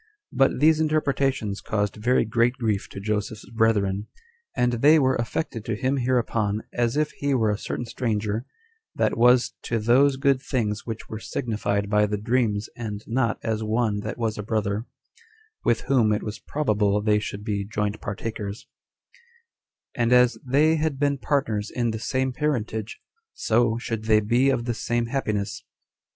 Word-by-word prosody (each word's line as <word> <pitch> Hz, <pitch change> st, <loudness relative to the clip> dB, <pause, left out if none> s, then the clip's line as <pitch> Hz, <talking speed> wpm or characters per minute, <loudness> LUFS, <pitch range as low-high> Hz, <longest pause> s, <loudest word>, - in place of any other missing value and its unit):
But 135 Hz, -1 st, +2 dB
these 155 Hz, +2 st, +5 dB
interpretations 135 Hz, -8 st, 0 dB
caused 105 Hz, -1 st, -1 dB
very 120 Hz, +4 st, +2 dB
great 115 Hz, +3 st, +2 dB
grief 110 Hz, -5 st, -1 dB
to -, -, -8 dB
Joseph's 105 Hz, +1 st, -3 dB
brethren; 105 Hz, -3 st, +1 dB, 0.5 s
and 125 Hz, 0 st, +2 dB
they 145 Hz, +7 st, +5 dB
were 130 Hz, -3 st, +3 dB
affected 115 Hz, 0 st, -3 dB
to 110 Hz, -, -1 dB
him 130 Hz, +5 st, 0 dB
hereupon 115 Hz, -4 st, 0 dB
as 120 Hz, +2 st, 0 dB
if 150 Hz, 0 st, +1 dB
he 140 Hz, -1 st, -1 dB
were 110 Hz, -4 st, +2 dB
a 105 Hz, -, -1 dB
certain 120 Hz, -, -4 dB
stranger, 110 Hz, -1 st, -2 dB, 0.5 s
that -, -, +1 dB
was 125 Hz, +1 st, +4 dB
to 115 Hz, -, -2 dB
those 130 Hz, +5 st, +4 dB
good 135 Hz, -1 st, +2 dB
things 110 Hz, -6 st, -2 dB
which 115 Hz, -1 st, -5 dB
were 110 Hz, -, -6 dB
signified 105 Hz, -5 st, -2 dB
by 105 Hz, 0 st, +3 dB
the 105 Hz, 0 st, -2 dB
dreams 110 Hz, -1 st, 0 dB
and 105 Hz, -3 st, -5 dB
not 115 Hz, -1 st, 0 dB
as 110 Hz, -1 st, -1 dB
one 110 Hz, -1 st, 0 dB
that 110 Hz, +1 st, -5 dB
was 110 Hz, -3 st, -2 dB
a -, -, -1 dB
brother, 105 Hz, +1 st, -2 dB, 0.8 s
with 120 Hz, -, +2 dB
whom 125 Hz, -5 st, +2 dB
it 105 Hz, -, 0 dB
was 105 Hz, +1 st, -5 dB
probable 105 Hz, -8 st, +1 dB
they 105 Hz, 0 st, +2 dB
should 105 Hz, -1 st, -6 dB
be 105 Hz, -2 st, -2 dB
joint 105 Hz, 0 st, -3 dB
partakers; 105 Hz, 0 st, -5 dB, 1.3 s
and 120 Hz, 0 st, 0 dB
as 125 Hz, 0 st, +5 dB
they 150 Hz, +5 st, +3 dB
had 155 Hz, -2 st, -1 dB
been 140 Hz, -1 st, +1 dB
partners 115 Hz, -7 st, -1 dB
in 120 Hz, -2 st, -1 dB
the 110 Hz, -, -4 dB
same 130 Hz, +3 st, -1 dB
parentage, 115 Hz, -6 st, -2 dB, 0.4 s
so 115 Hz, 0 st, +2 dB
should 115 Hz, -2 st, -4 dB
they 110 Hz, -1 st, +5 dB
be 120 Hz, +6 st, +2 dB
of 125 Hz, -3 st, 0 dB
the 120 Hz, -, -1 dB
same 120 Hz, +1 st, -1 dB
happiness. 105 Hz, -6 st, -2 dB
115 Hz, 165 wpm, -25 LUFS, 105-130 Hz, 1.3 s, these